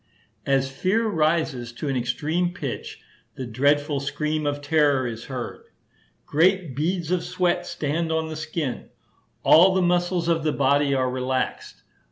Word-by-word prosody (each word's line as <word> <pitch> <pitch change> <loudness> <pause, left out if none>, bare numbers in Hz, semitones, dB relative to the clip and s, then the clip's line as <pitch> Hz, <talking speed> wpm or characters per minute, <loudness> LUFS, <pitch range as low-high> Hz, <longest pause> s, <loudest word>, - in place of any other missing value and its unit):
As 135 -1 +1
fear 190 +11 0
rises 155 - 0
to 145 - -5
an 135 - -1
extreme 155 +8 -1
pitch, - - -6 0.3
the 130 - -5
dreadful 145 +4 +1
scream 150 +2 -2
of 145 0 -1
terror 145 -3 +2
is 115 -1 -5
heard. 125 -3 -6 0.6
Great 170 -2 +2
beads 170 +3 -1
of 180 -2 +1
sweat 175 -1 0
stand 160 +3 -2
on 160 0 0
the 160 - -6
skin. 155 -4 -4 0.5
All 185 +4 +6
the 190 - +3
muscles 175 0 +1
of 165 -2 +1
the 155 -2 +1
body 140 +1 +2
are 130 -1 +1
relaxed. 130 0 -3
150 Hz, 150 wpm, -24 LUFS, 135-170 Hz, 0.6 s, All